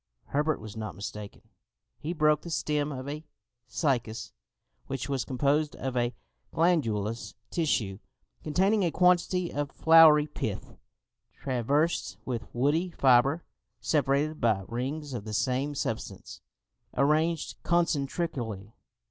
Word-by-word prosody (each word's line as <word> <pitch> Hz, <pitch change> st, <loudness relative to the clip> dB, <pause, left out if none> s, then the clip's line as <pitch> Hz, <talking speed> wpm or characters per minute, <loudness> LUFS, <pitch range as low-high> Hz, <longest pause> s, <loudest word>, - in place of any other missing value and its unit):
Herbert 150 Hz, +2 st, +1 dB
was 110 Hz, 0 st, -9 dB
not 110 Hz, -1 st, -5 dB
mistaken: 105 Hz, +1 st, -7 dB, 0.6 s
he 155 Hz, -, -4 dB
broke 150 Hz, -2 st, +3 dB
the 170 Hz, -, -8 dB
stem 150 Hz, -2 st, -1 dB
of 130 Hz, -1 st, -6 dB
a 150 Hz, +2 st, -5 dB, 0.4 s
cycas, 120 Hz, -7 st, -1 dB, 0.6 s
which 135 Hz, 0 st, -3 dB
was 135 Hz, -3 st, -1 dB
composed 145 Hz, +3 st, 0 dB
of 130 Hz, -1 st, -4 dB
a 120 Hz, -1 st, 0 dB, 0.4 s
glandulous 115 Hz, -, 0 dB, 0.2 s
tissue, 110 Hz, -, 0 dB, 0.4 s
containing 190 Hz, +7 st, +2 dB
a 175 Hz, -, +2 dB
quantity 180 Hz, 0 st, +2 dB
of 145 Hz, -1 st, -2 dB
floury 160 Hz, -2 st, +7 dB
pith, 110 Hz, -9 st, -5 dB, 0.6 s
traversed 140 Hz, +6 st, 0 dB
with 120 Hz, -3 st, -4 dB
woody 145 Hz, +9 st, +1 dB
fibre, 135 Hz, +1 st, +3 dB, 0.4 s
separated 145 Hz, +3 st, +1 dB
by 110 Hz, -4 st, +2 dB
rings 135 Hz, +5 st, -4 dB
of 115 Hz, -4 st, -4 dB
the 110 Hz, 0 st, -6 dB
same 130 Hz, +6 st, 0 dB
substance, -, -, -5 dB, 0.6 s
arranged 155 Hz, +4 st, +1 dB
concentrically. 140 Hz, -, -1 dB
140 Hz, 115 wpm, -28 LUFS, 120-155 Hz, 0.6 s, floury